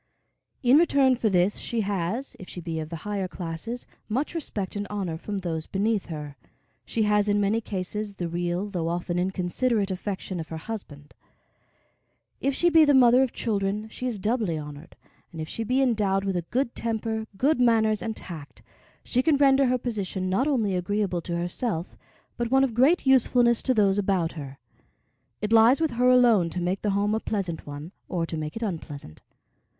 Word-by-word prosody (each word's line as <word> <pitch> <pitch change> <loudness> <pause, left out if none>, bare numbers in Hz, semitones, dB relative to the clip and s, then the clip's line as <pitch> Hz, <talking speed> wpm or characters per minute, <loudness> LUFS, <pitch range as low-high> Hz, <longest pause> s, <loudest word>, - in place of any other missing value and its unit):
In 255 +4 +6
return 275 -6 +4
for 230 -2 0
this, 185 +1 +2
she 230 -1 -2
has, 200 +6 -2
if 185 - -10
she - - -7
be 165 -1 -4
of 155 -1 -5
the 170 - -5
higher 200 -2 -2
classes, 180 +8 -6 0.2
much 260 +10 -1
respect 210 - -4
and 205 0 -3
honor 195 -5 -3
from 200 +5 -5
those 165 -4 -3
beneath 205 +1 0
her. 150 -4 -7 0.5
She 225 - 0
has, 210 0 +2
in 205 0 +3
many 205 +3 +1
cases 205 +1 -4
the 175 -3 -3
real 175 +3 -2
though 175 -5 -3
often 175 +1 -2
inconsiderate 190 +4 0
affection 190 -1 -4
of 160 - -6
her 160 - -5
husband. 160 -7 -8 1.3
If 275 0 0
she 345 +4 +3
be 325 -1 +7
the 290 -2 +5
mother 250 0 +6
of 265 -3 +1
children, 210 0 -2
she 250 - -5
is 235 -4 -2
doubly 210 -4 0
honored, 150 +1 -9 0.4
and 165 - -9
if 155 - -4
she 225 - -4
be 255 +4 +2
endowed 205 -6 +1
with 195 -1 -1
a 175 -2 -2
good 255 -1 0
temper, 220 -1 -2
good 285 +5 +2
manners, 220 -3 +3
and 225 -1 -3
tact, 155 -5 -9 0.4
she 250 - +1
can 295 +1 +3
render 275 -1 +5
her 255 0 +2
position 200 -6 -3
not 250 +9 +2
only 225 -9 +1
agreeable 185 -1 -1
to 170 0 -3
herself, 175 +1 -3 0.4
but 240 -1 -1
one 265 +2 +4
of 260 -4 0
great 275 +10 +3
usefulness 245 -2 +4
to 255 - +1
those 200 -2 +3
about 190 -4 +1
her. 140 -4 -8 0.9
It 210 +2 0
lies 230 +5 +6
with 320 -2 +1
her 245 +2 +3
alone 235 -8 +5
to 180 - -4
make 180 +2 -1
the 210 - 0
home 205 +1 +1
a 220 - +1
pleasant 190 -9 -3
one, 145 +4 -7 0.2
or 170 -2 -1
to 165 - -5
make 155 0 -4
it 225 - -4
unpleasant. 150 - -6
205 Hz, 190 wpm, -26 LUFS, 175-235 Hz, 1.3 s, be